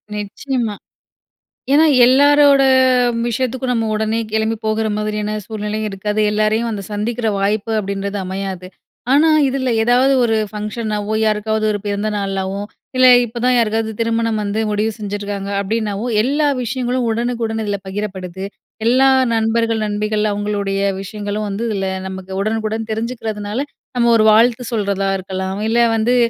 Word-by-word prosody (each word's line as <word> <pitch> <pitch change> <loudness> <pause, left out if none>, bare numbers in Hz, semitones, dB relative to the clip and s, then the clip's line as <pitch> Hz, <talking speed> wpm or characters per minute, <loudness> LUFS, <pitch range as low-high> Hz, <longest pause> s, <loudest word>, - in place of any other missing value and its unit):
நிச்சயமா. 220 +2 -3 1.0
ஏன்னா, 315 +2 +6 0.2
எல்லாரோட 285 +1 +5 0.6
விஷயத்துக்கும் 255 +2 -1
நம்ம 225 -1 0
உடனே 220 +1 0
கிளம்பி 220 +1 +1
போகற 220 0 0
மாதிரியான 210 0 -2
சூழ்நிலையும் 215 0 -3
இருக்காது. 210 +2 -3
எல்லாரையும் 215 +2 +1
அந்த 205 -2 -4
சந்திக்கிற 225 +2 -2
வாய்ப்பு 210 +3 0
அப்பிடின்றது 200 0 -3
அமையாது. 190 -1 -5 0.5
ஆனா, 315 +3 +5 0.2
இதில 260 -2 -1
எதாவது 250 +3 +4
ஒரு 225 -1 +2 0.2
ஃபங்ஷனாவோ, 210 0 -3
யாருக்காவது 215 0 0
ஒரு 205 - -2
பிறந்த 205 +1 -1
நாளாவோ, 195 0 -2 0.4
இல்ல 255 0 +6 0.2
இப்பதான் 245 +2 0
யாருக்காவது 220 -1 +1
திருமணம் 230 -1 0
வந்து 205 +2 -2
முடிவு 215 +2 0
செஞ்சுருக்காங்க 205 -1 -4
அப்பிடின்னாவோ, 210 +1 -2 0.2
எல்லா 290 +3 +1 0.2
விஷயங்களும் 250 +1 -1
உடனுக்குடன் 230 -1 -2
இதுல 205 -1 -2
பகிரப்படுது. 190 -2 -5 0.4
எல்லா 260 +3 +5 0.2
நண்பர்கள், 225 0 +1
நண்பிகள் 210 +1 -1
அவுங்களுடைய 200 -1 -2 0.2
விஷயங்களும் 205 +1 -4
வந்து 200 +4 -3
இதுல 195 -2 -2 0.2
நமக்கு 190 0 -8
உடனுக்குடன் 220 +1 -2
தெரிஞ்சுக்கிறதுனால, 220 -1 -3 0.4
நம்ம 235 -1 +3
ஒரு 215 - +3
வாழ்த்து 235 +2 +3
சொல்றதா 200 -3 -1
இருக்கலாம், 190 +1 -4
இல்ல 235 +1 +2 0.2
வந்து 235 +3 +2
215 Hz, 130 wpm, -18 LUFS, 205-235 Hz, 1.0 s, ஏன்னா